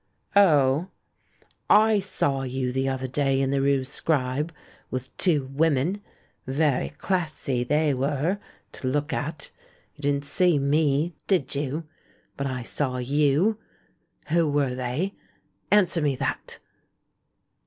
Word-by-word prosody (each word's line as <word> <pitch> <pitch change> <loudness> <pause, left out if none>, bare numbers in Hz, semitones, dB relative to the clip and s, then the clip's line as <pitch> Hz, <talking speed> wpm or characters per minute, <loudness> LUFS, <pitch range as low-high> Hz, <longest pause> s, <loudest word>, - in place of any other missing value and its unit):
"Oh?" 155 -4 +4 0.8
^^I 215 -1 +5
saw 140 -7 -1
you 130 -1 -2
the 135 +1 0
other 130 0 -2
day 135 +1 +1
in 135 0 +1
the 140 -1 +1
rue 140 -1 +2
Scribe, 140 +2 -1 0.4
with 130 0 -5
two 155 -7 +2
women. 160 +6 +1 0.5
Very 140 0 +1
classy 150 -6 -2
they 150 +3 +2
were 145 +8 0 0.2
— - - -36
to 130 - -6
look 145 +3 -1
at. 150 +1 -4 0.4
You 145 - -16
didn't 140 0 0
see 175 +2 +3
me, 145 +3 +1
did 175 -10 +1
you? 145 +3 -2 0.5
But 140 - -2
I 130 -2 -4
saw 130 +1 -2
you! 145 - +2 0.7
Who 165 -1 +3
were 145 -2 +1
tliey? 130 +10 -2 0.6
Answer 185 -5 +4
me 145 -2 +1
that." 130 0 -3
145 Hz, 130 wpm, -25 LUFS, 135-160 Hz, 0.8 s, ^^I